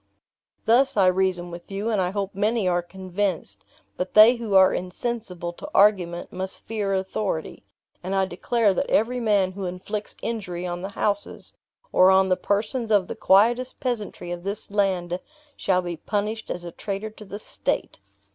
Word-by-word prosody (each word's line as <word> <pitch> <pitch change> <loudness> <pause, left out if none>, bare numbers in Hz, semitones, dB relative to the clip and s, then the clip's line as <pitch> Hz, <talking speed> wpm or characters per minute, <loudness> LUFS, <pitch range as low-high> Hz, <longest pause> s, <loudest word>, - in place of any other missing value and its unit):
"Thus 245 +2 +4
I 195 - +5
reason 185 -1 +1
with 170 +3 -10
you, 205 +4 -2
and 210 -3 +1
I 180 - +1
hope 200 0 -3
many 210 +1 +1
are 175 -1 +2
convinced; 185 0 -4 0.3
but 185 - -4
they 220 +3 +8
who 225 -4 -2
are 190 -1 +7
insensible 180 -2 -4
to - - -9
argument 185 -4 +3
must 185 +1 -2
fear 210 -3 -2
authority, 190 -3 -2 0.4
and 185 +2 -3
I 190 0 +3
declare 205 +3 +1
that 280 - -1
every 245 +4 +2
man 205 -5 +2
who 190 0 -5
inflicts 205 +4 -5
injury 185 -6 -3
on 175 0 -4
the 190 - -4
houses, 205 -1 -2 0.4
or 185 - +6
on 190 0 +5
the 185 - +4
persons 210 +5 -1
of 205 -4 +3
the - - -5
quietest 240 +6 +3
peasantry 225 -8 -3
of 175 0 -5
this 200 +1 -4
land, 185 -3 0 0.4
shall 185 -2 +1
be 175 -1 -4
punished 215 +5 -3
as 175 - -4
a 170 - -7
traitor 200 +4 -5
to 215 - -13
the 200 0 -7
state." 210 - -3
195 Hz, 175 wpm, -24 LUFS, 180-215 Hz, 0.4 s, they